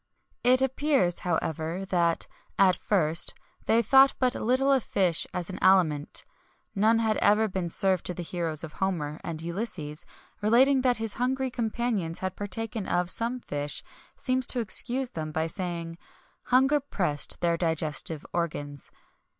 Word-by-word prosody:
It 255 Hz, +1 st, +4 dB
appears, 265 Hz, -, +1 dB
however, 165 Hz, +1 st, -2 dB
that, 170 Hz, -3 st, +1 dB, 0.3 s
at 185 Hz, -2 st, +5 dB
first, 165 Hz, -4 st, +3 dB, 0.3 s
they 230 Hz, +1 st, +3 dB
thought 270 Hz, +4 st, +5 dB
but 255 Hz, -1 st, +1 dB
little 260 Hz, +4 st, +1 dB
of 265 Hz, -, +3 dB
fish 180 Hz, -5 st, 0 dB
as 180 Hz, +1 st, -3 dB
an 185 Hz, -, -7 dB
aliment. 160 Hz, -6 st, +2 dB, 0.5 s
None 220 Hz, +2 st, +3 dB
had 220 Hz, -2 st, +1 dB
ever 215 Hz, +2 st, +3 dB
been 185 Hz, -3 st, -3 dB
served 190 Hz, 0 st, +2 dB
to 180 Hz, -, -1 dB
the 175 Hz, -, -5 dB
heroes 165 Hz, -2 st, -3 dB
of 155 Hz, -2 st, -8 dB
Homer, 165 Hz, -6 st, -3 dB
and 160 Hz, -1 st, -6 dB
Ulysses, 170 Hz, -4 st, -4 dB, 0.3 s
relating 260 Hz, +6 st, +4 dB
that 250 Hz, -1 st, +2 dB
his 225 Hz, -1 st, -2 dB
hungry 260 Hz, +1 st, 0 dB
companions 225 Hz, -7 st, -2 dB
had 185 Hz, 0 st, -4 dB
partaken 210 Hz, +1 st, -4 dB
of 180 Hz, 0 st, +1 dB
some 240 Hz, +2 st, -1 dB
fish, 145 Hz, -5 st, -4 dB, 0.3 s
seems 255 Hz, -1 st, 0 dB
to 250 Hz, -, 0 dB
excuse 245 Hz, +4 st, -1 dB
them, 155 Hz, -5 st, -5 dB
by 160 Hz, +1 st, -1 dB
saying: 170 Hz, -1 st, -5 dB, 0.5 s
"Hunger 270 Hz, +4 st, +3 dB
pressed 175 Hz, -, -1 dB
their 170 Hz, -1 st, +2 dB
digestive 160 Hz, -2 st, -1 dB
organs." 145 Hz, -5 st, -4 dB
190 Hz, 150 wpm, -27 LUFS, 165-240 Hz, 0.5 s, at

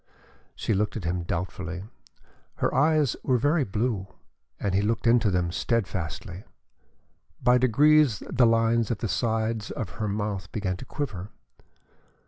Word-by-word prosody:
She -, -, -1 dB
looked 105 Hz, +3 st, 0 dB
at 105 Hz, -, -6 dB
him 85 Hz, +2 st, -1 dB
doubtfully. 90 Hz, +1 st, -4 dB, 0.7 s
Her -, -, 0 dB
eyes 150 Hz, -2 st, +3 dB
were 130 Hz, -2 st, +2 dB
very 145 Hz, +5 st, +2 dB
blue 105 Hz, -2 st, -2 dB, 0.5 s
and 100 Hz, -2 st, -1 dB
he 95 Hz, -, +3 dB
looked 110 Hz, +3 st, -1 dB
into 115 Hz, -2 st, +4 dB
them 90 Hz, -2 st, 0 dB
steadfastly. 95 Hz, -3 st, -2 dB, 1.0 s
By 125 Hz, 0 st, +5 dB
degrees 140 Hz, -1 st, +4 dB
the 125 Hz, -2 st, +4 dB
lines 115 Hz, 0 st, +2 dB
at 115 Hz, -, -1 dB
the 115 Hz, -, -3 dB
sides 110 Hz, 0 st, -1 dB
of 110 Hz, -6 st, -4 dB
her 105 Hz, -, 0 dB
mouth 105 Hz, -1 st, -3 dB
began 95 Hz, -4 st, -2 dB
to -, -, -9 dB
quiver. 105 Hz, -10 st, -5 dB
110 Hz, 140 wpm, -26 LUFS, 95-120 Hz, 1.0 s, By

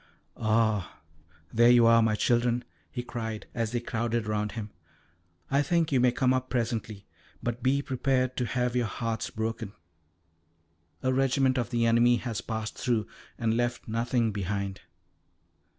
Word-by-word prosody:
"Ah, 110 Hz, -5 st, +1 dB, 0.5 s
there 120 Hz, +1 st, +6 dB
you 120 Hz, -1 st, +7 dB
are, 115 Hz, 0 st, +6 dB
my 110 Hz, -1 st, +2 dB
children," 120 Hz, +2 st, +1 dB, 0.3 s
he 120 Hz, -, -4 dB
cried 115 Hz, -3 st, -5 dB
as 115 Hz, -2 st, -1 dB
they 120 Hz, -, 0 dB
crowded 115 Hz, -1 st, -2 dB
round 105 Hz, -1 st, -1 dB
him; 110 Hz, -3 st, -6 dB, 0.8 s
"I 140 Hz, +1 st, +4 dB
think 165 Hz, +2 st, +1 dB
you 135 Hz, -, +3 dB
may 125 Hz, 0 st, +4 dB
come 130 Hz, +1 st, +2 dB
up 130 Hz, 0 st, -1 dB
presently, 115 Hz, -4 st, -2 dB, 0.4 s
but 120 Hz, +1 st, -2 dB
be 140 Hz, +2 st, +2 dB
prepared 130 Hz, -1 st, 0 dB
to 125 Hz, -, 0 dB
have 125 Hz, 0 st, -1 dB
your 120 Hz, -2 st, +1 dB
hearts 115 Hz, +1 st, -3 dB
broken. 110 Hz, -1 st, -4 dB, 1.3 s
A 130 Hz, 0 st, +2 dB
regiment 135 Hz, 0 st, +2 dB
of 120 Hz, -, -2 dB
the 120 Hz, -1 st, +1 dB
enemy 120 Hz, +1 st, +5 dB
has 120 Hz, -2 st, -3 dB
passed 110 Hz, -1 st, -5 dB
through, 120 Hz, -4 st, +1 dB, 0.3 s
and 115 Hz, -2 st, +1 dB
left 120 Hz, 0 st, -1 dB
nothing 115 Hz, 0 st, 0 dB
behind. 100 Hz, -1 st, -3 dB
120 Hz, 150 wpm, -28 LUFS, 110-125 Hz, 1.3 s, you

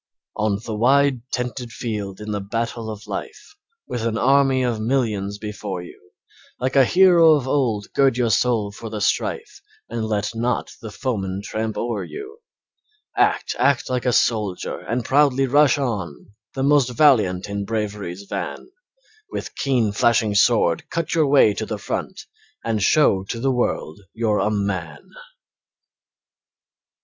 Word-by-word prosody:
On 105 Hz, -2 st, 0 dB
the 110 Hz, -, -4 dB
wide, 130 Hz, +3 st, +3 dB
tented 125 Hz, -1 st, -4 dB
field 105 Hz, -5 st, -5 dB
in 105 Hz, 0 st, -6 dB
the 105 Hz, -1 st, -2 dB
battle 115 Hz, +2 st, -3 dB
of 105 Hz, -1 st, -8 dB
life, -, -, -7 dB, 0.3 s
With 120 Hz, -, -4 dB
an 115 Hz, -1 st, -1 dB
army 135 Hz, +1 st, +3 dB
of 120 Hz, -3 st, -1 dB
millions 110 Hz, -5 st, -1 dB
before 105 Hz, -3 st, -5 dB
you; 90 Hz, 0 st, -15 dB, 0.5 s
Like 130 Hz, +2 st, -2 dB
a 135 Hz, -1 st, +6 dB
hero 175 Hz, -1 st, +6 dB
of 140 Hz, -4 st, 0 dB
old 120 Hz, -7 st, 0 dB
gird 135 Hz, -3 st, +3 dB
your 120 Hz, -3 st, +1 dB
soul 110 Hz, -1 st, +1 dB
for 110 Hz, +2 st, -8 dB
the 105 Hz, -1 st, -5 dB
strife 100 Hz, -, -2 dB, 0.3 s
And 115 Hz, -1 st, -3 dB
let 105 Hz, 0 st, -2 dB
not 120 Hz, +2 st, -2 dB
the 110 Hz, -, -7 dB
foeman 100 Hz, -5 st, -3 dB
tramp 110 Hz, 0 st, -3 dB
o'er 120 Hz, -2 st, -2 dB
you; 415 Hz, +2 st, -9 dB, 0.8 s
Act, -, -, +1 dB
act 140 Hz, -2 st, +2 dB
like 125 Hz, 0 st, -1 dB
a -, -, +4 dB
soldier 105 Hz, -6 st, 0 dB
and 120 Hz, +1 st, -3 dB
proudly 135 Hz, -1 st, +3 dB
rush 145 Hz, +1 st, +4 dB
on 105 Hz, -, -4 dB, 0.2 s
The 135 Hz, -, -1 dB
most 140 Hz, -2 st, +4 dB
valiant 110 Hz, -10 st, +3 dB
in 100 Hz, 0 st, -3 dB
Bravery's 100 Hz, -3 st, -4 dB
van, 100 Hz, -, -6 dB, 0.6 s
With -, -, -6 dB
keen, 125 Hz, -6 st, 0 dB
flashing 110 Hz, 0 st, +2 dB
sword 100 Hz, -5 st, +2 dB
cut 165 Hz, -2 st, -2 dB
your 160 Hz, -3 st, +3 dB
way 135 Hz, -7 st, +5 dB
to -, -, -4 dB
the -, -, -3 dB
front -, -, -4 dB, 0.4 s
And 110 Hz, -2 st, 0 dB
show 100 Hz, -5 st, +3 dB
to 115 Hz, -, -5 dB
the 135 Hz, +3 st, +1 dB
world 120 Hz, -9 st, -2 dB, 0.2 s
you're 110 Hz, -2 st, +1 dB
a -, -, +1 dB
Man. 95 Hz, -7 st, -3 dB
115 Hz, 155 wpm, -22 LUFS, 105-130 Hz, 0.8 s, a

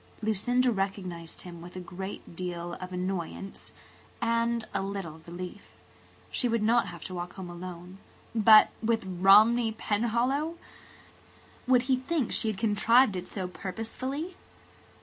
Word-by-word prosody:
Lucinda 245 Hz, +4 st, +2 dB
recognized 190 Hz, -5 st, -3 dB
him 175 Hz, -2 st, -9 dB
with 175 Hz, +2 st, -11 dB
a -, -, -4 dB
great 185 Hz, 0 st, -7 dB
deal 175 Hz, -1 st, -4 dB
of 185 Hz, 0 st, -6 dB
annoyance 185 Hz, +1 st, -4 dB, 0.5 s
and 230 Hz, 0 st, +1 dB
a 195 Hz, -, 0 dB
little 195 Hz, -5 st, -5 dB
relief. 180 Hz, +4 st, -8 dB, 0.6 s
She 250 Hz, -, +1 dB
would 230 Hz, -2 st, +1 dB
not 235 Hz, +2 st, +3 dB
have 170 Hz, -2 st, -8 dB
to 185 Hz, -, -6 dB
walk 175 Hz, 0 st, -5 dB
home 185 Hz, -2 st, -7 dB
alone. 180 Hz, +1 st, -9 dB, 0.3 s
But 215 Hz, -1 st, +7 dB
with 225 Hz, -2 st, +1 dB
Romney 210 Hz, +6 st, +5 dB
Penhallow! 240 Hz, +10 st, 0 dB, 1.1 s
Would 250 Hz, -1 st, +5 dB
he 260 Hz, 0 st, +2 dB
think 270 Hz, 0 st, -1 dB
she -, -, +3 dB
had 215 Hz, -3 st, -1 dB
contrived 225 Hz, +2 st, +4 dB
it 180 Hz, 0 st, -5 dB
so 190 Hz, -3 st, -4 dB
purposely? 255 Hz, -, -5 dB
200 Hz, 135 wpm, -29 LUFS, 180-235 Hz, 1.1 s, But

